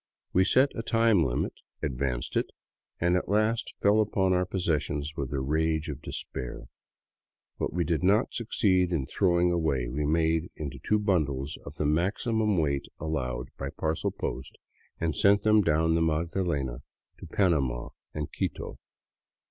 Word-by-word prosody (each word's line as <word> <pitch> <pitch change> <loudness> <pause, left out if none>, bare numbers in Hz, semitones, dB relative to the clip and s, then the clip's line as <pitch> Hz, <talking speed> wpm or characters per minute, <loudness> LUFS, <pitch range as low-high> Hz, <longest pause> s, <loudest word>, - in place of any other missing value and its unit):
We 95 +1 +4
set 130 +7 +4
a - - -3
time 115 -5 +3
limit, 65 -4 -1 0.3
ad 75 - 0
vanced 60 -1 -2
it, - - +1 0.5
and 90 +1 +2
at 90 - -1
last 110 +3 +1
fell 105 +2 +4
upon 95 -3 +1
our 90 0 +1
possessions 75 -5 -1
with 70 -3 -3
the 70 -1 -2
rage 80 +3 0
of 70 - -5
de - - -8
spair. - - -6 0.9
What - - -2
we 85 0 0
did 80 0 0
not 100 +6 +3
succeed 95 -6 +1
in 80 -6 0
throwing 90 +2 +2
away 75 -8 0
we 75 +4 -1
made 80 +1 +1
into 70 -3 -6
two 105 +9 +1
bundles 75 -10 0
of 70 - -8
the 75 - -2
maximum 100 +7 +1
weight 70 -4 0
allowed 65 -5 -3
by 70 - -3
parcel 80 +3 -1
post 65 - -5 0.4
and 80 -2 -1
sent 100 +1 +4
them 110 -1 +5
down 80 -2 +2
the 85 - +2
Magdalena 80 -5 0 0.4
to - - -9
Panama 70 -11 +1 0.2
and 75 -1 -3
Quito. - - -4
80 Hz, 160 wpm, -28 LUFS, 70-95 Hz, 0.9 s, them